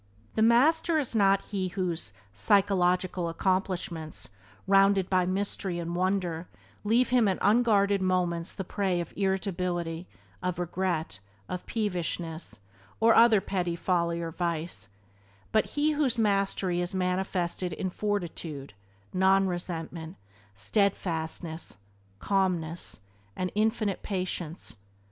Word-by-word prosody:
The 220 - 0
master 305 +9 +4
is 275 -6 -1
not 195 -2 +4
he 190 -2 -1
whose 175 - -2 0.2
"psychological 180 - +2
accomplishments," 175 -3 -2 0.4
rounded 195 -1 +4
by 185 -1 +3
mystery 190 -1 -2
and 170 0 -3
wonder, 180 -2 0 0.4
leave 230 +4 +3
him 245 -4 +4
in 190 - +1
unguarded 205 -2 +3
moments 180 -2 0
the 190 - -5
prey 190 -1 -1
of 170 - -5
irritability, 180 -3 -1 0.3
of 180 -1 -2
regret, 175 - -2 0.3
of 180 - -5
peevishness, 175 - -3 0.4
or 225 +1 +6
other 230 -2 +7
petty 180 -3 -2
folly 170 -1 0
or 165 - -4
vice, 170 -7 -3 0.6
but 220 - +3
he 300 +1 +3
whose 290 -5 +1
"mastery" 195 -4 +1
is 175 +2 -2
manifested 180 -1 -1
in 185 +3 -3
fortitude, 170 - -3 0.4
non 190 +1 +4
resentment, 170 -2 -4 0.4
steadfastness, 165 - -1 0.4
calmness, 180 - -1 0.3
and 185 0 -2
infinite 215 -1 0
patience. 180 - -4
185 Hz, 110 wpm, -28 LUFS, 170-200 Hz, 0.6 s, other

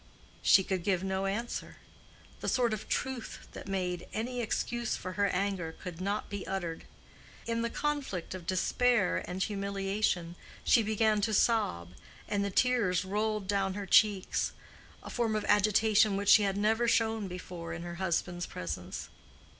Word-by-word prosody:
She 190 - +6
could 185 -2 -2
give 190 -2 +1
no 190 0 -1
answer. 230 +5 -3 0.6
The - - -5
sort 240 -3 +2
of 215 - -6
truth 260 -4 -3
that - - -9
made 180 -2 -2
any 245 +3 -2
excuse 235 +1 -1
for 185 - -5
her 200 +2 +1
anger 185 -4 -1
could 180 -1 -7
not 200 +2 -1
be 200 -2 -6
uttered. 175 -4 -3 0.6
In 230 0 -1
the 235 - 0
conflict 280 - -2
of 180 -2 -8
despair 220 +2 +2
and 185 +1 -2
humiliation 195 -3 -1 0.3
she 235 - +5
began 215 0 +2
to 215 +1 +1
sob, 90 - +2 0.4
and 200 -1 0
the 200 - -1
tears 205 -5 +2
rolled 210 +1 -1
down 195 -1 0
her 205 -1 -4
cheeks—a 200 0 0
form 230 -3 0
of 215 - -1
agitation 215 0 +4
which 200 0 0
she 215 - +9
had 200 -1 0
never 220 +3 +2
shown 225 -2 +2
before 180 -2 -7
in 170 +1 -5
her 175 0 -6
husband's 175 -1 -1
presence. 85 -4 -5
200 Hz, 155 wpm, -31 LUFS, 185-220 Hz, 0.6 s, she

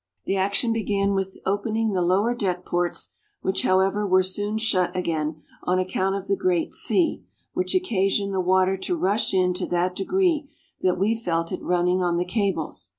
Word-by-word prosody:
The 195 - 0
action 200 +5 +1
began 200 -3 0
with 195 -1 -2
opening 215 +3 0
the 185 - +1
lower 195 +7 +2
deck 185 -6 -2
ports, 175 0 -2 0.3
which, 190 0 0
however 190 +2 +2
were 185 0 +4
soon 205 +3 0
shut 185 -5 +1
again, 155 -3 -2 0.2
on 180 +1 0
account 185 +1 0
of 195 0 -5
the 200 - +2
great 180 -3 0
sea, 345 -3 +1 0.3
which 365 +1 -1
occasioned 200 - +1
the 190 - 0
water 185 +1 +2
to 350 - -2
rush 205 - +1
in 185 -1 +2
to 180 - -3
that 180 +1 0
degree 325 - +1 0.3
that 180 -1 +2
we 200 +5 +2
felt 165 -7 -2
it - - -4
running 180 +1 +1
on 175 -1 +1
the 175 - 0
cables. 180 - -2
190 Hz, 180 wpm, -24 LUFS, 180-210 Hz, 0.3 s, were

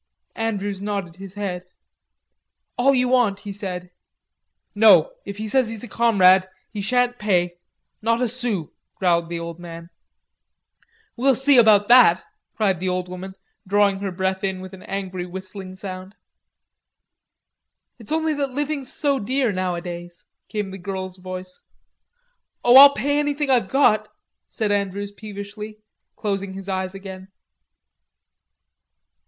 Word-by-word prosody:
Andrews 205 -3 -2
nodded 200 -4 -4
his 195 0 -10
head. 190 -3 -4 1.1
"All 270 +2 +3
you 250 0 +2
want," 230 -6 +2
he 205 - -7
said. 180 -3 -5 0.8
"No, 205 -7 +6 0.2
if 200 0 -6
he 215 +1 -4
says 255 +1 +2
he's 225 -1 -6
a - - -7
comrade, 190 -5 +4 0.2
he 210 -2 -5
shan't 245 +3 +1
pay, 180 -4 0 0.4
not 230 +2 +1
a 250 - +1
sou," 230 -9 -1 0.2
growled 170 -3 +1
the 170 -1 -4
old 170 0 -7
man. 170 0 -10 1.2
"We'll 265 +2 +3
see 270 +3 +5
about 210 -3 +5
that," 240 -8 +7 0.3
cried 195 -5 +1
the 185 +1 -2
old 180 0 -2
woman, 185 +1 -8 0.3
drawing 200 0 +2
her 195 -1 -3
breath 190 +2 -2
in 190 -1 -2
with 185 +1 -10
an 190 - -11
angry 185 -2 -5
whistling 185 +1 -8
sound. 190 +1 -8 1.8
"It's 225 - -9
only 320 0 +1
that 285 -2 -2
living's 290 -1 -2
so 280 -2 0
dear 255 +2 0
nowadays," 175 -2 -5 0.2
came 210 -3 -3
the 195 - -8
girl's 185 0 -5
voice. 185 0 -8 1.0
"Oh, 245 +1 +6
I'll 280 +1 +10
pay 285 +6 0
anything 290 -1 0
I've 235 -7 +2
got," 265 -6 +3 0.4
said 215 -3 -2
Andrews 200 0 -2
peevishly, 210 +1 -8 0.4
closing 200 -2 -3
his 195 0 -9
eyes 190 0 -3
again. 190 -1 -9
200 Hz, 135 wpm, -22 LUFS, 185-230 Hz, 1.8 s, I'll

